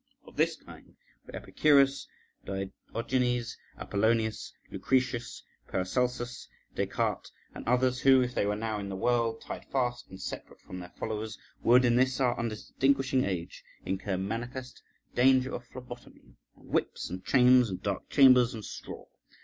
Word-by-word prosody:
Of - - -15
this - - +2
kind - - -15 0.3
were - - -9
Epicurus, 140 -2 +3 0.4
Diogenes, 115 +5 -2 0.2
Apollonius, 110 +2 0 0.2
Lucretius, 125 -2 -1 0.2
Paracelsus, 120 +5 -2 0.3
Des - - -1
Cartes, - - -2 0.2
and - - -9
others, 125 +1 +2
who, 135 -1 +6
if 125 0 -4
they 100 - 0
were 105 - 0
now 110 0 -3
in 100 -1 -5
the 95 - -4
world, 115 +2 0
tied - - -7
fast 120 -2 -2
and 95 - -11
separate - - -7
from 90 - -9
their 90 0 -9
followers, 110 +3 -5 0.2
would 125 +2 +5
in 120 0 +3
this 130 0 +2
our 125 -2 +2
undistinguishing 130 +4 0
age 90 -4 -4 0.2
incur 95 0 -2
manifest 120 +6 -5 0.3
danger 130 +1 +4
of 120 - -6
phlebotomy, 120 - -12 0.2
and - - -19
whips, - - -1
and 90 +1 -6
chains, 125 -2 +5
and 90 - -6
dark 100 -2 -3
chambers, 130 -4 +6
and 110 -3 -7
straw. - - -8
120 Hz, 150 wpm, -29 LUFS, 105-130 Hz, 0.4 s, who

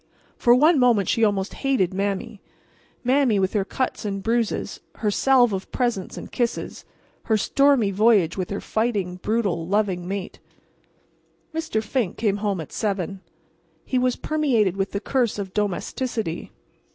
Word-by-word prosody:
For 240 -1 +5
one 300 +4 +5
moment 235 -7 +3
she 230 - +1
almost 200 -2 +1
hated 260 -11 0
Mame—Mame, 205 +5 -2
with 190 -1 0
her 205 -3 +1
cuts 255 +6 -3
and 195 -2 -3
bruises, 230 0 -1 0.2
her 210 -2 -1
salve 245 -1 +4
of 190 0 -5
presents 240 -7 -2
and - - -8
kisses; 240 -1 -3 0.4
her 220 - +2
stormy 270 -1 +3
voyage 200 -4 +3
with 185 -2 -3
her 200 - -3
fighting, 205 -6 -1
brutal, 195 -5 -1
loving 190 -3 0
mate. 195 0 -5 1.1
Mr. 320 -9 -2
Fink 220 -4 -1
came 205 -3 +1
home 205 -3 -1
at 160 - -7
7. 195 -2 -2 0.6
He 255 - 0
was 250 0 +1
permeated 250 - +1
with 195 0 -1
the 200 - -3
curse 240 +1 0
of 195 -2 -5
domesticity. 210 -1 -2
210 Hz, 145 wpm, -23 LUFS, 195-245 Hz, 1.1 s, For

